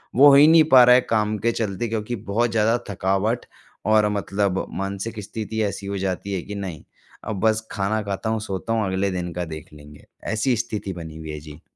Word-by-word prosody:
वो 140 Hz, +4 st, +8 dB
हो -, -, +7 dB
ही 145 Hz, +2 st, +8 dB
नहीं 160 Hz, 0 st, +7 dB
पा 130 Hz, -2 st, +9 dB
रहा 125 Hz, 0 st, +7 dB
है 125 Hz, -, +5 dB
काम 110 Hz, -1 st, +1 dB
के 115 Hz, +3 st, +1 dB
चलते 110 Hz, 0 st, -2 dB
क्योंकि 110 Hz, +2 st, -3 dB
बहुत 115 Hz, +4 st, +1 dB
ज़्यादा 115 Hz, +1 st, +2 dB
थकावट 100 Hz, +4 st, 0 dB, 0.4 s
और 110 Hz, -1 st, +4 dB
मतलब 100 Hz, -1 st, -1 dB, 0.2 s
मानसिक 100 Hz, +3 st, -4 dB
स्थिति 110 Hz, +2 st, -4 dB
ऐसी 100 Hz, -1 st, -3 dB
हो 100 Hz, 0 st, -3 dB
जाती 95 Hz, +1 st, -3 dB
है 95 Hz, -, -2 dB
कि 105 Hz, -, -7 dB
नहीं 95 Hz, -7 st, -6 dB, 0.4 s
अब 110 Hz, -4 st, -3 dB
बस 110 Hz, 0 st, +1 dB
खाना 100 Hz, +2 st, -1 dB
खाता 100 Hz, +2 st, -3 dB
हूँ 110 Hz, 0 st, 0 dB
सोता 100 Hz, +1 st, -3 dB
हूँ, 110 Hz, -2 st, +1 dB
अगले 95 Hz, +1 st, 0 dB
दिन 90 Hz, -1 st, -3 dB
का 90 Hz, 0 st, -3 dB
देख 80 Hz, -2 st, -8 dB
लेंगे। 75 Hz, 0 st, -14 dB, 0.3 s
ऐसी 115 Hz, +4 st, +1 dB
स्थिति 105 Hz, -4 st, -4 dB
बनी 80 Hz, -3 st, -8 dB
हुई 80 Hz, -1 st, -8 dB
है। 75 Hz, -, -6 dB
जी। 75 Hz, +1 st, -12 dB
105 Hz, 215 wpm, -23 LUFS, 95-110 Hz, 0.4 s, पा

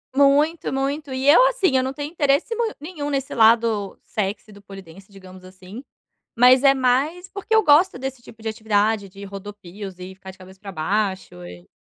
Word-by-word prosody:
Muito, 285 Hz, +3 st, +2 dB
muito. 275 Hz, +1 st, -3 dB
E 260 Hz, +1 st, -3 dB
eu 340 Hz, +12 st, +7 dB
assim, 405 Hz, -, 0 dB
eu 255 Hz, -, +1 dB
não 265 Hz, +1 st, -4 dB
tenho 290 Hz, +2 st, -6 dB
interesse 295 Hz, +7 st, 0 dB
mui 465 Hz, -1 st, -1 dB
nenhum 300 Hz, -1 st, -6 dB
nesse 275 Hz, -2 st, -3 dB
lado 225 Hz, -3 st, +2 dB
sexy 210 Hz, +1 st, -4 dB
do 200 Hz, 0 st, -15 dB
pole 195 Hz, -1 st, -11 dB
dance, 190 Hz, +3 st, -17 dB
digamos 185 Hz, -1 st, -14 dB
assim, 185 Hz, +6 st, -12 dB, 0.5 s
mas 250 Hz, +2 st, +6 dB
é 275 Hz, -1 st, +6 dB
mais 275 Hz, +8 st, 0 dB
porque 400 Hz, +3 st, -3 dB
eu 440 Hz, -, +4 dB
gosto 310 Hz, +3 st, +4 dB
desse 265 Hz, -1 st, -6 dB
tipo 225 Hz, -1 st, -16 dB
de 220 Hz, -, -4 dB
atividade, 215 Hz, -2 st, -1 dB
de 200 Hz, +2 st, -12 dB
rodopios, 200 Hz, -1 st, -10 dB
e 185 Hz, +1 st, -9 dB
ficar 190 Hz, 0 st, -11 dB
de 185 Hz, -, -20 dB
cabeça 190 Hz, 0 st, -16 dB
para 200 Hz, -1 st, -9 dB
baixo, 190 Hz, -, -3 dB
e 90 Hz, 0 st, -13 dB
225 Hz, 195 wpm, -21 LUFS, 195-280 Hz, 0.5 s, eu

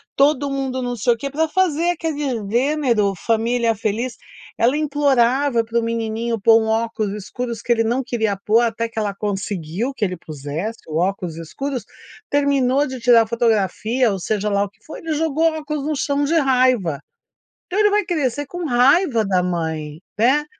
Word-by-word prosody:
todo 280 Hz, 0 st, +3 dB
mundo 265 Hz, -1 st, -2 dB
não 245 Hz, 0 st, -2 dB
sei 240 Hz, +2 st, +2 dB
o 230 Hz, -, -7 dB
que, 280 Hz, -, -4 dB
pra 315 Hz, +3 st, 0 dB
fazer 345 Hz, -1 st, +1 dB
aquele 320 Hz, -3 st, -3 dB, 0.3 s
gênero 240 Hz, -5 st, +1 dB
família 230 Hz, +3 st, +1 dB
feliz. 225 Hz, +4 st, -2 dB, 0.4 s
Ela 240 Hz, +4 st, +3 dB
implorava 275 Hz, -4 st, +2 dB
pro 230 Hz, +1 st, -1 dB
menininho 230 Hz, 0 st, -2 dB
pôr 225 Hz, +2 st, +5 dB
um 220 Hz, -, -2 dB
óculos 220 Hz, -2 st, -1 dB
escuros, 230 Hz, +3 st, -5 dB
que -, -, -2 dB
ele 225 Hz, -1 st, +3 dB
não 240 Hz, +4 st, 0 dB
queria 220 Hz, -4 st, -1 dB
pôr, 215 Hz, +3 st, +2 dB
até 230 Hz, 0 st, 0 dB
que 225 Hz, -1 st, -5 dB
ela 205 Hz, -2 st, -1 dB
conseguiu 200 Hz, -, -3 dB
que 240 Hz, -, -4 dB
ele 185 Hz, -2 st, -3 dB
pusesse 155 Hz, +8 st, -5 dB
o 155 Hz, -, -3 dB
óculos 180 Hz, -2 st, -1 dB
escuros. 250 Hz, -, -4 dB, 0.5 s
Terminou 280 Hz, -1 st, +2 dB
de 260 Hz, -3 st, -6 dB
tirar 235 Hz, -2 st, +5 dB
fotografia 225 Hz, +1 st, +1 dB
ou, 195 Hz, -, -3 dB
seja 210 Hz, +3 st, -1 dB
lá 200 Hz, 0 st, +2 dB
o 205 Hz, -, -4 dB
que 200 Hz, +2 st, -34 dB
foi, 315 Hz, -, -8 dB
ele 325 Hz, -1 st, -3 dB
jogou 320 Hz, +1 st, +1 dB
o 315 Hz, -, -5 dB
óculos 300 Hz, -2 st, -4 dB
no 310 Hz, -, 0 dB
chão 280 Hz, +1 st, 0 dB
de 320 Hz, +4 st, 0 dB
raiva. 255 Hz, -, +2 dB, 0.7 s
Então 385 Hz, -, -2 dB
ele 420 Hz, 0 st, +5 dB
vai 415 Hz, 0 st, +2 dB
crescer 290 Hz, -6 st, -1 dB
com 350 Hz, +5 st, -5 dB
raiva 255 Hz, -, +3 dB
da 185 Hz, -2 st, +2 dB
mãe, 160 Hz, -3 st, -3 dB, 0.2 s
né. 265 Hz, +7 st, +3 dB
235 Hz, 180 wpm, -20 LUFS, 215-280 Hz, 0.7 s, pôr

